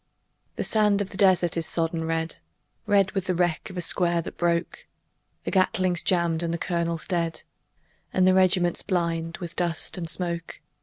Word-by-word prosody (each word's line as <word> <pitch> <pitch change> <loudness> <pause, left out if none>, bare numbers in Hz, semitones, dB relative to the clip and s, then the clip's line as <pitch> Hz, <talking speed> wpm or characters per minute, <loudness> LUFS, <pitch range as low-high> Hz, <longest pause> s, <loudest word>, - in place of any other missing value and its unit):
The - - -2
sand 210 -2 +2
of 200 -1 -3
the - - -7
desert 185 -4 +4
is 165 -1 +3
sodden 165 -1 -1
red 165 0 -2 0.5
Red 200 -2 +3
with 195 -2 -2
the 185 - -1
wreck 175 -2 0
of 185 - -9
a - - -1
square 170 0 +2
that - - -8
broke; 170 0 -1 0.6
The - - -3
Gatling's 185 -2 +2
jammed 170 -3 +1
and 170 -1 -2
the 170 - -1
colonel 170 -1 -2
dead, 170 -3 -1 0.7
And 185 - +2
the 185 - +5
regiment's 185 -2 +3
blind 170 -3 -2
with 170 -1 -8
dust 175 +1 -1
and 165 -2 -4
smoke. 170 0 -3
175 Hz, 175 wpm, -25 LUFS, 165-185 Hz, 0.7 s, the